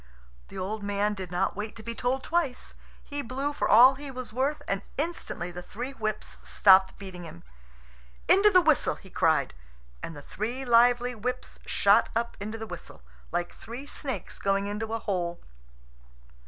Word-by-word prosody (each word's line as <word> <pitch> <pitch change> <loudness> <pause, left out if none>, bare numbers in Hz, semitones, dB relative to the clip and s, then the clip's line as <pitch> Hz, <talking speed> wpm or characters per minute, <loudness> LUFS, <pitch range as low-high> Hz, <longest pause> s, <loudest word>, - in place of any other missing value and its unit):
The - - -10
old 205 +3 -3
man 205 +1 0
did 190 -3 -7
not 175 - 0
wait 210 +2 -5
to 225 - -11
be 230 +1 -4
told 255 +2 -1
twice. 325 -7 -1 0.3
He 290 -1 -4
blew 275 +3 -3
for - - -1
all 250 +4 +9
he 280 +1 -8
was 255 -3 -7
worth, 275 +5 0
and 195 0 -1 0.2
instantly 295 - -3
the 175 +1 -7
three 245 +8 -6
whips 215 -5 -4
stopped 190 -1 +5
beating 185 -3 -8
him. 85 - -11 0.8
"Into 400 +2 +7
the 370 -3 +6
whistle!" 310 -4 +3
he 190 - -16
cried; 155 -5 +2 0.5
and 165 - -6
the 145 - -10
three 240 - -4
lively 245 +1 +4
whips 250 +2 -5
shot - - +4
up 235 +1 -1
into 215 +3 -5
the 220 - -5
whistle, 215 - -10 0.3
like 175 0 -2
three 240 +5 -9
snakes 265 - -6
going 195 0 +1
into 210 +2 -4
a - - +1
hole. 180 -6 -2
225 Hz, 170 wpm, -28 LUFS, 195-260 Hz, 0.8 s, all